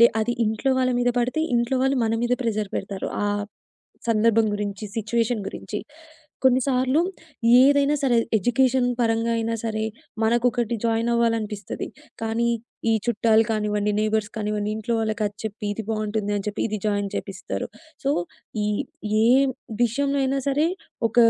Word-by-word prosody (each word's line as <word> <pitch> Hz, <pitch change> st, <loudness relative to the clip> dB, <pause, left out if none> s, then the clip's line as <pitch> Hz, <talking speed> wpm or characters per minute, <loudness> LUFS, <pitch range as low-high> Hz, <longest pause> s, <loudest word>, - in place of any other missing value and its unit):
లే 235 Hz, -, +9 dB
అది 240 Hz, +2 st, 0 dB
ఇంట్లో 220 Hz, +5 st, +1 dB
వాళ్ళ 255 Hz, 0 st, +2 dB
మీద 245 Hz, 0 st, +2 dB
పడితే 255 Hz, +6 st, 0 dB
ఇంట్లో 240 Hz, +2 st, +1 dB
వాళ్ళు 270 Hz, 0 st, +2 dB
మన 225 Hz, -, +1 dB
మీద 245 Hz, +1 st, +2 dB
ప్రెషర్ 215 Hz, -3 st, -1 dB
పెడతారు. 195 Hz, -1 st, -4 dB, 0.2 s
ఆహ్, 205 Hz, 0 st, 0 dB, 0.7 s
సందర్భం 225 Hz, 0 st, +4 dB
గురించి, 205 Hz, 0 st, -4 dB
సిట్యుయేషన్ 225 Hz, 0 st, 0 dB
గురించి. 210 Hz, -, -5 dB, 0.6 s
కొన్నిసార్లు 260 Hz, +2 st, +3 dB, 0.6 s
ఏదైనా 285 Hz, +2 st, +5 dB
సరే 255 Hz, -4 st, +3 dB, 0.2 s
ఎడ్యుకేషన్ 245 Hz, +4 st, +2 dB
పరంగైనా 230 Hz, 0 st, +1 dB
సరే 220 Hz, -1 st, -2 dB, 0.4 s
మనకొకటి 240 Hz, +1 st, +2 dB
జాయినవ్వాలనిపిస్తది. 230 Hz, -2 st, 0 dB, 0.4 s
కానీ 225 Hz, +1 st, 0 dB, 0.4 s
ఈ -, -, +4 dB
చుట్టాలు 225 Hz, -1 st, +4 dB
కానివ్వండి 210 Hz, -1 st, 0 dB
నైబర్స్ 215 Hz, 0 st, 0 dB
కానివ్వండి 210 Hz, -1 st, -1 dB
ఇంట్లో 225 Hz, +2 st, -2 dB
వాళ్ళకి 220 Hz, 0 st, -1 dB
అది 205 Hz, 0 st, -6 dB
చెప్పి 215 Hz, +1 st, -5 dB
ఇది 225 Hz, -, -4 dB
బావుంటుంది 215 Hz, -1 st, -1 dB
అని 200 Hz, -, -3 dB
చెప్పి 210 Hz, -, -3 dB
ఇది 215 Hz, -, -2 dB
జాయిన్ 205 Hz, -1 st, +1 dB
చేయిపిస్తారు. 195 Hz, -2 st, -4 dB, 0.4 s
సో, 275 Hz, -, +1 dB, 0.5 s
ఈ -, -, 0 dB, 0.6 s
ఏం 260 Hz, +4 st, +5 dB, 0.4 s
విషయంలో 275 Hz, +4 st, +1 dB
అయినా 270 Hz, +1 st, +1 dB
సరే 290 Hz, +3 st, +2 dB, 0.4 s
ఒక 225 Hz, -, -15 dB
225 Hz, 140 wpm, -24 LUFS, 215-245 Hz, 0.7 s, లే